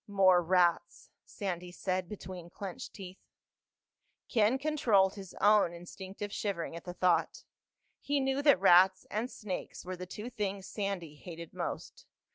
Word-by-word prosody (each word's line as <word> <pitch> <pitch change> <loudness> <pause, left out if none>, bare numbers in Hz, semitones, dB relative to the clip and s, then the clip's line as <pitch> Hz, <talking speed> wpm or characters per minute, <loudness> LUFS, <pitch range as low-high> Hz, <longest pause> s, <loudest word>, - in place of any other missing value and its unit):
"More 190 -3 +5
rats," 175 0 +1 0.2
Sandy 180 -3 -4
said 185 0 -2
between 185 -4 -8
clenched 190 0 -7
teeth. 190 -1 -9 1.1
Ken 225 +1 +3
controlled 235 -10 +3
his 195 -3 -10
own 205 -4 +4
instinctive 190 +4 -8
shivering 170 -6 -3
at 170 - -9
the 180 -1 -6
thought. 175 -3 +1 0.6
He 285 0 0
knew 270 +1 0
that 285 -9 +5
rats 190 0 +6
and 225 +4 -1
snakes 195 -7 -6
were 185 +1 -4
the 180 0 -8
two 215 +6 -7
things 200 -4 -3
Sandy 195 -8 -4
hated 170 0 -9
most. - - -5
190 Hz, 140 wpm, -32 LUFS, 175-210 Hz, 1.1 s, rats